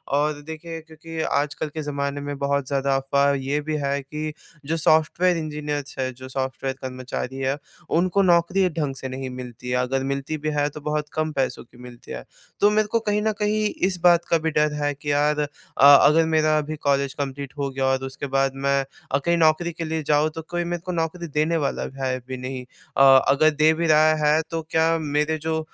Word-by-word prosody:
और 150 +1 +2
देखिए 165 +1 -7
क्योंकि 160 0 -10
आजकल 145 0 -1
के 155 +1 -5
ज़माने 140 -1 -3
में 145 0 -5
बहुत 140 -1 0
ज़्यादा 140 -1 0
अफवाह 140 +1 +2
ये 135 +2 -1
भी 155 +1 -3
है 140 0 -1
कि 150 +3 -5 0.3
जो 160 +3 -1
सॉफ्टवेयर 165 +3 +3
इंजीनियर्स 150 -3 -4
हैं, 130 -1 -1
जो 130 +1 -10
सॉफ्टवेयर 130 0 -3
कर्मचारी 130 0 -5
है, 135 +1 -1 0.3
उनको 185 +3 +2
नौकरी 180 +1 +3
ढंग 140 -4 -1
से 135 - -6
नहीं 130 0 -5
मिलती 125 -1 -8
है। 125 - 0
अगर 130 +1 0
मिलती 140 +3 -3
भी 155 +1 -3
है 145 0 +2
तो 150 +1 -10
बहुत 150 0 -2
कम 155 0 -1
पैसों 135 -3 -2
की 120 +1 -22
मिलती 120 -1 -12
है। - - -6 0.4
तो 205 - +5
मेरे 210 0 +2
को 230 - +3
कहीं 210 -1 0
न 220 0 +1
कहीं 215 +1 +1 0.2
इस 185 -2 -2
बात 175 -1 +5
का 165 - +4
भी 160 0 -2
डर 150 0 +2
है 145 0 +1
कि 145 +1 -4
यार 150 +1 +2
अ, 145 - -1 0.4
अगर 145 +3 +7
मेरा 155 0 +3
अभी 155 +1 -2
कॉलेज 140 -1 +2
कम्प्लीट 140 -1 -5
हो 140 -1 -1
गया 135 0 -2
और 130 0 +1
उसके 135 +1 -6
बाद 135 0 +2 0.2
मैं 140 0 +3 0.3
अ, 140 - +3
कहीं 170 +5 +1
नौकरी 165 +1 +3
के 165 - -5
लिए 160 0 -2
जाऊँ 150 +1 +2
तो 160 - -4
कोई 175 0 -1
मेरे 175 0 -3
को 180 - -3
नौकरी 170 +1 -2
देने 155 +3 +1
वाला - - -2
है 130 -1 0
भी 130 - -5
नहीं। 130 0 -5 0.3
अ, - - +4 0.3
अगर 140 +3 +5
दे 155 +1 +3
भी 165 +1 -1
रहा 155 0 +5
है 155 +2 +4
तो 165 0 -2
क्या 165 +1 +3
मेरे 150 +1 0
जो 160 0 0
150 Hz, 215 wpm, -23 LUFS, 135-160 Hz, 0.4 s, अगर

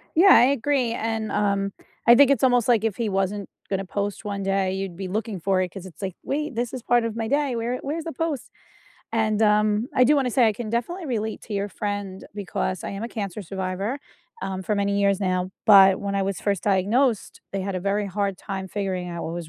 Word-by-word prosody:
Yeah, 355 +5 +6
I 235 - +7
agree, 270 -2 +1
and, 225 -1 -2
um, 200 -1 0 0.3
I 235 - +9
think 280 +2 +6
it's 270 -4 +1
almost 245 -3 +4
like 230 -3 +4
if 220 -3 0
he 225 -1 -1
wasn't 195 +1 -1 0.2
gonna 195 0 -1
post 200 +2 -3
one 200 -2 -3
day, 195 -1 +1
you'd 190 -2 -4
be 190 +1 -5
looking 215 0 -3
for 190 +1 +2
it 185 - -1
‘cause 190 -1 -9
it's 185 0 -12
like, 190 -3 -4
wait, 300 -1 -2
this 240 0 -1
is 255 - -5
part 240 +1 +2
of 230 -1 -3
my 225 -1 -2
day, 280 0 +1
where 240 +2 -2
where's 310 +4 -4
the 330 - -4
post? 310 -2 -3 0.6
And, 215 -1 +1
um, 210 +1 +3
I 250 - +5
do 290 +5 +5
wanna 270 -3 +1
say 240 0 +4
I 220 - +3
can 220 +1 -6
definitely 315 - -2
relate 220 -4 -2
to 215 - -6
your 200 0 -1
friend 205 -3 -4
because 190 -2 -3
I - - -3
am 200 +2 -5
a 230 - -3
cancer 205 -4 -5
survivor, 190 - -3 0.4
um, 190 -1 -3
for 210 - -1
many 200 0 0
years 200 0 +2
now, 185 -1 0
but 195 -3 +8
when 200 -1 -3
I 195 - +1
was 195 0 -2
1st 200 -3 -1
diagnosed, 210 +5 +1
they 195 -1 -2
had 195 0 -3
a 185 - -2
very 200 +2 0
hard 200 0 -2
time 190 -1 -5
figuring 185 -2 -3
out 170 -1 -5
what 165 - -4
was 170 -2 -6
205 Hz, 235 wpm, -24 LUFS, 195-235 Hz, 0.6 s, I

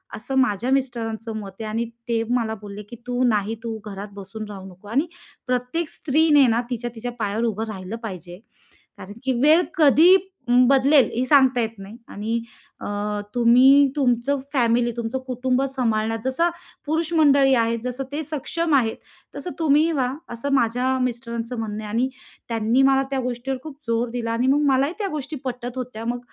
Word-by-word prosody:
असं 250 +5 -5
माझ्या 245 -1 +1
मिस्टरांचं 230 -4 -2
मत 200 -2 -7
आहे. 220 - -4
आणि 230 +2 -1 0.2
ते 230 -1 +1
मला 230 -3 0
बोलले 205 0 -8
की 240 - -8
"तू 245 +1 0
नाही, 215 -1 0
तू 225 -1 -4
घरात 200 0 -6
बसून 200 +2 -8
राहू 195 -2 -8
नको 185 +3 -16
आणि 280 +9 +1 0.4
प्रत्येक 250 +6 -1
स्त्रीने 295 -2 +3
ना 230 +1 +2
तिच्या 240 -1 -3
तिच्या 245 +2 -5
पायावर 215 +2 -1
उभं 220 -1 -1
राहिलं 195 -1 -6
पाहिजे. 180 -4 -7 0.6
कारण 200 - -9
की 260 -1 +1
वेळ 310 +5 +6 0.2
कधी 315 +4 +7 0.3
अं, 245 0 +5
बदलेल 275 +1 +5
हे 245 - +1
सांगता 260 -2 +4
येत 225 0 -3
नाही 200 +4 -10
आणि 220 +3 -3 0.4
अ, - - -6 0.5
तुम्ही, 255 +4 +6
तुमचं 270 0 +1
फॅमिली, 240 -2 +2
तुमचं 235 +3 -2
कुटुंब 255 +1 0
सांभाळण्याचं 225 -1 0
जसं 335 +7 +1 0.4
पुरुष 320 +2 -1
मंडळी 280 -4 +5
आहेत, 230 -1 +1
जसं 250 +2 -3
ते 300 +2 -2
सक्षम 310 +2 -1
आहेत, 230 -5 +2 0.4
तसं 360 - -5
तुम्हीही 310 +1 +3
व्हा." 270 -5 +1 0.3
असं 275 +4 -3
माझ्या 255 +1 +1
मिस्टरांचं 235 0 -4
म्हणणं 215 -1 -4
आहे. 210 - -6
आणि 250 +3 +1 0.4
त्यांनी 230 +3 +2
मला 270 0 +4
त्या 270 - 0
गोष्टीवर 250 +2 -3
खूप 310 -3 -9
जोर 230 +1 0
दिला 230 -1 -3
आणि 245 +3 0
मग 285 +2 +3
मलाही 275 +5 +1
त्या 405 - -1
गोष्टी 300 0 -5
पटत 245 0 -5
होत्या. 245 -3 -5
मग 240 +1 -2
245 Hz, 175 wpm, -23 LUFS, 225-270 Hz, 0.6 s, कधी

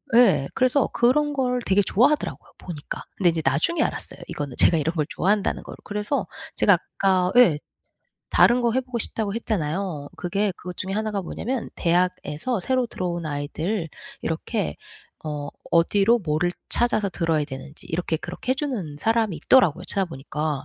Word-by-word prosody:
예. 190 - +5
그래서 255 +2 +3
그런 290 +5 +3
걸 250 -2 0
되게 195 +2 +4
좋아하더라고요, 280 +11 +1
보니까. 155 -5 -7
근데 180 -3 +3
이제 165 -1 -1
나중에 160 - +2
알았어요. - - -4
이거는 145 -4 -5
제가 165 - +5
이런 160 +3 -1
걸 150 -2 +1
좋아한다는 205 +2 +1
거를. - - -10
그래서 210 +7 -2 0.3
제가 - - +6
아까 185 -2 +1
예 170 -12 +6 0.7
다른 245 +1 +5
거 235 - +2
해 260 - +2
보고 250 -2 -5
싶다고 215 -1 -3
했잖아요. 175 -7 -2
그게 195 +3 0
그것 180 0 -8
중에 190 +1 -3
하나가 215 -1 -1
뭐냐면 240 +7 -4
대학에서 180 - 0
새로 255 +5 +1
들어온 175 -5 -3
아이들 160 +6 -2 0.3
이렇게 185 +5 -2 0.5
어 145 -2 -4 0.2
어디로 200 +7 +4
뭐를 175 +1 0 0.2
찾아서 215 -4 +2
들어야 165 -4 0
되는지 140 +1 -8
이렇게 165 -1 -1
그렇게 180 +10 -3
해 - - -1
주는 235 - -3
사람이 220 -3 +1
있더라고요, 180 - +4
찾아보니까. 150 -5 -2
185 Hz, 380 characters per minute, -24 LUFS, 160-230 Hz, 0.7 s, 제가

